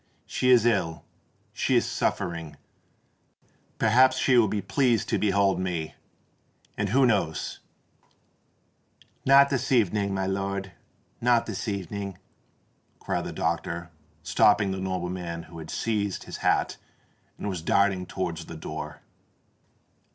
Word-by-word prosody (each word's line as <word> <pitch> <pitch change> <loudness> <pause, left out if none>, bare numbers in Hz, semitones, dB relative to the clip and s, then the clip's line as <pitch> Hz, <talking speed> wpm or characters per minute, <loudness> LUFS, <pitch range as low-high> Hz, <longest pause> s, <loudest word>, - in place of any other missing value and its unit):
She 125 - 0
is 120 -3 +6
ill—she 90 -8 -2
is - - +3
suffering—perhaps 110 +8 -2
she 130 0 +3
will 115 -3 +5
be 105 +1 -1
pleased 120 +1 +1
to - - +1
behold 100 -2 +2
me—and 90 +3 -7
who 130 +5 +4
knows——" 95 -9 0 1.7
"Not 140 +1 +7
this 130 -1 -1
evening, 105 -4 +2
my 95 -1 -1
lord—not 100 +5 -2
this 110 0 -5
evening!" 100 -1 -4 0.8
cried - - -3
the - - -4
doctor, 85 +1 -2 0.3
stopping 105 -2 +3
the 95 - -3
nobleman 90 -2 -3
who 85 0 -11
had 80 0 -9
seized 105 -4 -2
his - - -7
hat - - +1 0.6
and - - -5
was 95 -4 -3
darting 95 +1 +2
towards 85 -3 -4
the 85 - -8
door. 75 -1 -7
95 Hz, 115 wpm, -26 LUFS, 85-110 Hz, 1.7 s, Not